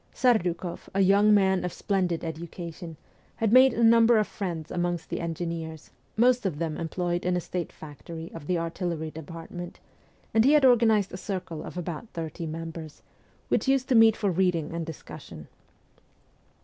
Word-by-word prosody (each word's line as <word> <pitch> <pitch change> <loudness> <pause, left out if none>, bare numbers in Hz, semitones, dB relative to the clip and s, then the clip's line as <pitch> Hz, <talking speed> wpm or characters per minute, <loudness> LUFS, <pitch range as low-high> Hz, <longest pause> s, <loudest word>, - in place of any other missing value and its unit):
Serduk6ff, 180 -8 0
a 195 - +3
young 200 +2 +5
man 190 -2 +3
of 180 - -2
splendid 180 -4 -1
education, 165 0 -7 0.4
had 225 -1 0
made 260 +1 +8
a 235 - 0
number 230 0 +6
of 215 - +3
friends 170 -7 -5
amongst 175 -1 -2
the - - -2
engineers, 165 -1 -5 0.3
most 245 +2 +4
of 185 -7 -2
them 160 -1 -2
employed 175 +1 -2
in 180 0 +1
a - - +1
state 175 0 -4
factory 160 +2 -9
of 150 -3 -9
the 180 - +1
artillery 165 -1 -3
department, 165 +3 -8 0.5
and 225 - +5
he 275 +4 +5
had 295 -3 +5
organized 225 -5 +4
a - - -4
circle 185 -5 -5
of - - -8
about 175 +5 -5
thirty 165 0 -5
members, 165 -1 -7 0.5
who - - +5
used 270 -1 +2
to 265 - +1
meet 225 -1 +6
for 205 -3 0
reading 170 -3 0
and 170 -1 -4
discussion. 135 - -10
175 Hz, 165 wpm, -27 LUFS, 165-210 Hz, 0.5 s, made